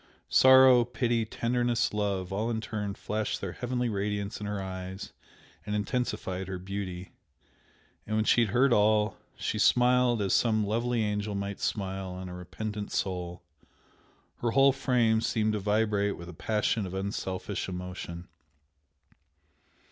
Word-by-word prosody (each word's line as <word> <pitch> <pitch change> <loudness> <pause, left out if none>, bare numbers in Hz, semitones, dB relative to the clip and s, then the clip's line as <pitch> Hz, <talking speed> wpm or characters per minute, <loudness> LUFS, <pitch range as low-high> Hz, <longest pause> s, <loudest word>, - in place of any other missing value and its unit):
Sorrow, 130 -2 +7
pity, 120 -1 0
tenderness, 120 +1 0
love, 100 -3 -1
all 110 +4 -1
in 115 -1 -1
turn 105 -2 -4
flashed 105 0 -2
their 95 - -4
heavenly 125 +4 -2
radiance 105 0 -2
in 105 - -5
her 105 -1 -3
eyes 95 0 -6 0.5
and 105 0 -3
intensified 100 -4 -2
her 95 -1 -4
beauty, 95 -1 -6 1.0
and 110 - -1
when 110 0 +1
she 120 - +4
had 115 - +2
heard 125 +4 +4
all, 105 0 +3 0.2
she 105 - -3
smiled 125 +2 +4
as 100 -2 0
some 110 -3 +3
lovely 115 +2 0
angel 105 0 -2
might 100 0 -4
smile 95 -2 -3
on 90 0 -7
a - - -7
repentant 105 +4 -5
soul. 90 -2 -3 0.9
Her 120 - -1
whole 135 +3 +5
frame 125 -4 +2
seemed 110 -1 +1
to 105 - -1
vibrate 105 0 +1
with 85 0 -9
a - - -8
passion 105 +2 0
of 90 - -6
unselfish 95 -1 -3
emotion. 90 -1 -6
105 Hz, 145 wpm, -29 LUFS, 95-115 Hz, 1.0 s, Sorrow